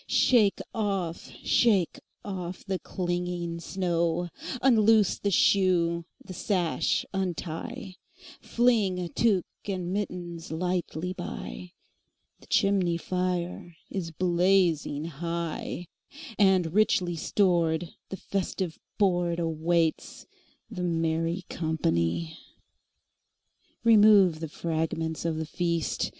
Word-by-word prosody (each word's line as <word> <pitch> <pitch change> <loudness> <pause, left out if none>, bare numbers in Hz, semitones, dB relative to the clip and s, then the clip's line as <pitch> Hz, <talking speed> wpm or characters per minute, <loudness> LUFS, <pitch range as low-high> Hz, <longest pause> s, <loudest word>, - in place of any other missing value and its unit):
Shake 220 -6 +4 0.2
off, 195 -7 -2
shake 200 -8 +3 0.3
off 185 -3 -5
the 190 -2 -2
clinging 175 -2 -3
snow; 170 -1 -1 0.3
Unloose 220 -5 +4
the 200 - 0
shoe, 175 -3 +3 0.2
the 185 - -8
sash 180 -3 0
untie, 185 +3 -4 0.4
Fling 205 -7 +1
tuque 205 -5 +2 0.2
and 185 -2 -3
mittens 175 -5 -4
lightly 180 0 -2
by; 180 0 -7 0.7
The - - -19
chimney 190 -4 +2
fire 180 -1 -3 0.2
is 185 -4 -3
blazing 175 -3 +2
high, 170 +2 -4 0.5
And, 185 -5 +4
richly 185 -4 +2
stored, 170 -2 +1 0.2
the 195 - -5
festive 190 -3 -3 0.2
boardAwaits 170 -3 0 0.4
the 180 - -5
merry 165 +1 0
company. 160 - -1 1.4
Remove 210 -7 +6
the 160 -1 -5
fragments 160 0 -2
of 165 -2 0
the 160 - -2
feast! 170 0 -1
175 Hz, 90 wpm, -27 LUFS, 165-190 Hz, 1.4 s, Remove